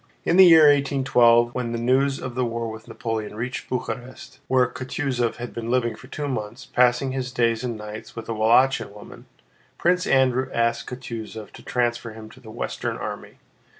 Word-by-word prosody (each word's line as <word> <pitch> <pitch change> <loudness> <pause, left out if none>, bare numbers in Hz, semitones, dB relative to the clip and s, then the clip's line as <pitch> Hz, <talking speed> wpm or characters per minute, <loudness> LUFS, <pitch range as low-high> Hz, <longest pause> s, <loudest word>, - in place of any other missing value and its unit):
In - - +2
the 190 -1 +9
year 165 -2 +8
1812, 130 -5 +4
when 125 -2 -3
news 130 +4 +1
of 130 - -6
the 125 +1 -1
war 115 -1 -3
with 110 0 -11
Napoleon 110 -2 -4
reached 125 +4 -5
Bucharest—where 125 0 -2
Kutúzov 130 -2 -2
had 120 0 -7
been 115 0 -5
living 120 -2 +1
for 110 - -14
two 145 -1 -4
months, 125 -1 -5
passing 125 +2 +2
his 130 -1 -3
days 115 -1 +1
and 120 -3 -3
nights 105 0 -9
with 115 - -7
a 115 - -2
Wallachian 115 +3 +3
woman—Prince 180 - -4
Andrew 130 0 +2
asked 115 0 0
Kutúzov 115 -4 -7
to - - -13
transfer 120 -2 -2
him 110 0 -11
to - - -16
the 110 - -13
Western 110 - -4
Army. - - -7
120 Hz, 170 wpm, -23 LUFS, 115-130 Hz, -, the